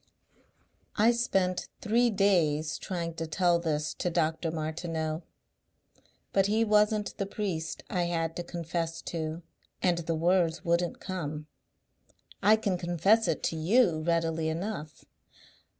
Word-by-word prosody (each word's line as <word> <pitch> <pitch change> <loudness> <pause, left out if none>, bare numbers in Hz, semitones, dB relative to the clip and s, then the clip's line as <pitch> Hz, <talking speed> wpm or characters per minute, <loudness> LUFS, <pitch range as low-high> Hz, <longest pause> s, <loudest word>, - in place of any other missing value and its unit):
"I 225 +1 +5
spent 190 -6 0
three 235 +2 +3
days 170 -7 +2
trying 170 -3 -3
to 165 - -3
tell 175 +1 +2
this 155 -2 -1
to 180 - -2
Dr. 165 -1 0
Martineau. 160 0 -3 1.1
But 195 0 +4
he 220 +2 +2
wasn't 210 0 +2
the 195 - -1
priest 190 -6 -3
I 180 -2 0
had 165 -1 -1
to 175 - -3
confess 165 -1 -4
to 160 0 -4 0.4
and 175 -2 +2
the 165 0 -2
words 170 0 +1
wouldn't 170 0 +1
come. 155 -6 -4 1.0
I 215 +2 +6
can 200 -4 -1
confess 175 +7 +3
it - - -1
to - - 0
you 170 0 +3
readily 165 -1 0
enough...." 160 -2 -5
170 Hz, 130 wpm, -29 LUFS, 160-195 Hz, 1.1 s, I